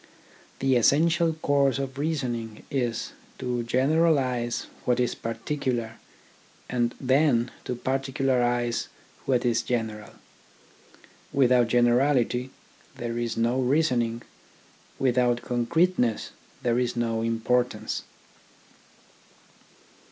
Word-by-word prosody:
The 135 -1 +2
essential 160 - +3
course 140 -2 +3
of 135 -1 -4
reasoning 125 -8 -3
is 120 -4 -1 0.3
to 125 -1 -2
general 150 +7 +3
ise 125 -3 -1 0.2
what 125 0 +1
is 125 -1 +1
particular, 115 0 -3 0.7
and 120 -1 -1
then 130 -3 +2
to 125 - -2
particularise 125 -2 0 0.4
what 125 -2 +2
is 115 -1 +2
general. 110 -3 -3 1.2
Without 125 -3 +4
generality 125 +1 +2 0.5
there 120 0 -4
is 120 -1 -2
no 120 +3 +1
reasoning, 125 -4 +1 0.7
without 125 -2 +2
concreteness 125 +1 +1 0.3
there 120 0 +2
is 125 -1 -1
no 115 -1 -1
importance. 115 +2 0
125 Hz, 90 wpm, -26 LUFS, 120-135 Hz, 1.2 s, Without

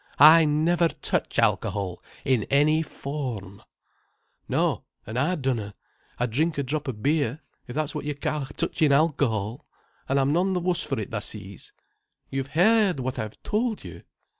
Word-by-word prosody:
I 160 +2 +9
never 160 +3 +3
touch - - -2
alcohol 95 -4 0 0.2
in 125 -6 +2
any 150 +3 +3
form." 125 - -5 0.9
"No, - - +1 0.2
an' 110 - -7
I 145 +9 +1
dunna. 120 - -2 0.4
I 120 - +1
drink 150 +8 0
a 140 - 0
drop 145 +2 -2
o' - - +1
beer, 140 +4 0 0.3
if 120 - -7
that's 155 -1 -1
what 150 - -4
you 150 -1 -2
ca' 145 0 -2
touchin' 155 -3 +1
alcohol. 140 -5 +1 0.4
An' 135 - +2
I'm 140 +1 +2
none 185 +3 +2
th' 180 - -1
wuss 180 -1 +1
for 135 -5 -2
it, 105 - -5
tha - - -2
sees." - - -8 0.6
"You've 135 0 -2
heard 205 -3 +4
what 130 0 -3
I've 110 -1 -5
told 220 +1 -1
you." - - -9
145 Hz, 165 wpm, -26 LUFS, 125-160 Hz, 0.9 s, I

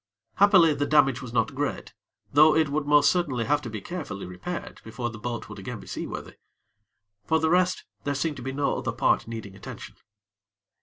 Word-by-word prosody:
Happily, 190 -6 +6
the 145 0 -1
damage 135 -3 +4
was 125 -3 -7
not 115 +2 +1
great; 140 +1 -3 0.4
though 155 +2 +7
it 160 -2 +3
would 145 0 -1
most 145 0 +6
certainly 140 -10 0
have 145 +3 +2
to 125 - -6
be 110 -2 -6
carefully 135 - -6
repaired 90 - -6
before 120 +1 -4
the 115 - -10
boat 120 0 -4
would 105 - -10
be - - -8
again 115 +3 -7
seaworthy. - - -6 0.9
For 160 - +3
the 160 0 +1
rest, 180 +1 +2 0.2
there 145 0 -1
seemed 150 0 -1
to - - -7
be 135 +2 -4
no 140 +1 0
other - - -3
part - - +2
needing 110 -4 -7
attention. - - -9
140 Hz, 195 wpm, -26 LUFS, 115-155 Hz, 0.9 s, though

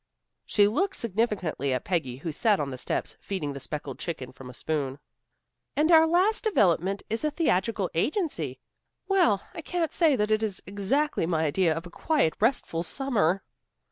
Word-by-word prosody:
She 205 -1 +4
looked 370 - 0
significantly 200 - -1
at 125 - -2
Peggy 160 -9 -1
who 160 +4 -4
sat 205 +6 +2
on 140 -2 -2
the 130 - -5
steps, - - -2
feeding 160 -8 -4
the 140 - -6
speckled 145 -1 -5
chicken 135 -7 -5
from 130 0 -11
a - - -10
spoon. 140 -3 -2 0.8
"And 310 +3 +3
our 320 -1 +7
last 370 +6 +3
development 195 - +2
is 225 +4 -2
a 305 - +2
theatrical 220 - +1
agency. 170 - -1 0.5
Well, 355 - +3
I - - -6
can't 330 -1 -2
say 320 -5 +3
that 210 -2 0
it 215 0 +3
is 210 -4 -2
exactly 205 - 0
my 160 -2 +1
idea 165 +3 +2
of 165 +2 -3
a 175 - -10
quiet, 290 - +1
restful 220 -7 +1
summer." 195 - 0
195 Hz, 175 wpm, -27 LUFS, -, 0.8 s, our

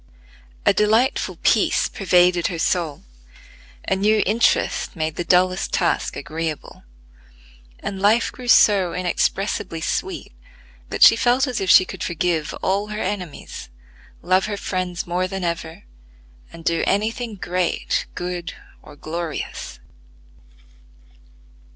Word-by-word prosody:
A - - +5
delightful 220 +6 +1
peace - - +3
pervaded 180 -2 +2
her 170 - -4
soul, 165 -3 -1 0.8
a 190 - +2
new 210 +2 +2
interest 220 0 +1
made 155 -2 -2
the 175 - -2
dullest 185 +1 +2
task 170 - 0
agreeable, 155 +1 -5 1.0
and 195 -1 -5
life 220 +4 +3
grew 250 - -10
so 195 -7 +5
inexpressibly 180 0 -1
sweet 365 - -3 0.6
that - - +2
she - - +9
felt 250 +2 +2
as 250 -6 -3
if 190 - -2
she 185 - +7
could - - -9
forgive 170 -2 -1
all 200 +2 0
her 210 0 -5
enemies, 180 - -5 0.5
love 185 +2 +2
her 205 -1 -3
friends 185 -2 -3
more 180 +1 -1
than 190 0 -5
ever, 170 +2 -4 0.7
and 165 -1 -12
do 170 0 +1
any 210 +3 +1
thing 230 -2 -6
great, 180 -2 -1
good, 180 -1 -5 0.3
or 145 - -14
glorious. 155 - -5
185 Hz, 125 wpm, -21 LUFS, 170-205 Hz, 1.0 s, she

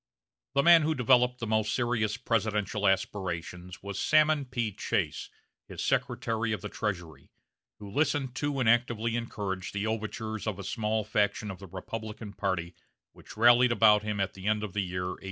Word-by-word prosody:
The 140 - +4
man 170 +1 +8
who 155 +1 0
developed 125 0 +3
the 115 - -4
most 110 -1 +1
serious 115 -3 0
presidential 105 -4 0
aspirations 90 -2 -2
was 100 -1 -5
Salmon 155 -2 +3
P. 120 -4 -2
Chase, - - -2 0.4
his - - -5
Secretary 115 0 0
of 105 - -4
the - - -5
Treasury, 90 -7 -5 0.5
who 105 - -10
listened 135 +2 0
to 145 -2 -1
and 125 - +1
actively 115 -1 +2
encouraged 100 -5 -4
the 100 +1 -1
overtures 110 0 -3
of 105 -4 -2
a 100 - -7
small 110 +2 -1
faction 105 0 0
of 95 - -10
the 95 - -10
Republican 105 +3 -7
party 95 -4 -2 0.4
which - - -14
rallied 120 +2 +6
about 105 -3 +5
him 105 -1 -3
at 95 -1 -1
the 95 +1 -7
end 105 0 +1
of 105 -4 -5
the 105 - 0
year 90 -1 -3
1863. 90 - -4
110 Hz, 175 wpm, -29 LUFS, 100-120 Hz, 0.5 s, man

